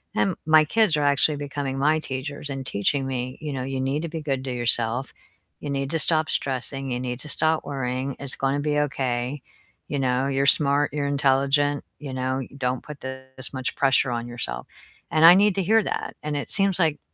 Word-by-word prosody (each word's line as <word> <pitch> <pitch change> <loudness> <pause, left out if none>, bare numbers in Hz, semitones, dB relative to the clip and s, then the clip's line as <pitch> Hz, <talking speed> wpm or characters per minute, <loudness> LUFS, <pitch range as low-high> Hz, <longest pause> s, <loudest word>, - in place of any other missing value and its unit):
and 190 -3 +1
my 155 0 +6
kids 215 0 +2
are 150 - 0
actually 145 +1 +3
becoming 140 -1 -4
my 150 +3 +2
teachers 145 +1 -5
and 135 -1 -5
teaching 130 +6 0
me, 130 -1 -4
you 150 -2 -4
know, 130 -1 -3
"You 135 0 -3
need 135 +3 -1
to 170 - -4
be 160 0 -5
good 135 -3 -2
to 130 - -3
yourself. 120 +1 0 0.5
You 145 - -6
need 135 -1 -2
to 165 - +1
stop 155 -1 +2
stressing, 135 0 -1
you 125 - -2
need 125 -1 -4
to 150 - -6
stop 160 +2 +1
worrying. 130 -1 -3
It's 140 -2 -1
gonna 135 +1 0
be 150 0 0
okay, 130 -1 -2 0.5
you 145 - -3
know, 130 0 +1
you're 140 0 0
smart, 145 0 +5
you're 145 -1 -1
intelligent, 140 +1 +1 0.2
you 140 -3 -7
know, 130 +1 -2 0.2
don't 125 -1 -2
put 150 -1 -10
this 130 0 -1
much 130 -1 -3
pressure 135 -1 +3
on 120 -1 -3
yourself." 115 - -4 0.4
And 160 -1 +4
I 175 +2 +10
need 205 -1 +3
to 195 - 0
hear 220 +4 +3
that, - - -4
and 150 -1 -2
it 145 - -5
seems 195 -2 +1
like 160 -4 +1
140 Hz, 205 wpm, -24 LUFS, 130-150 Hz, 0.5 s, I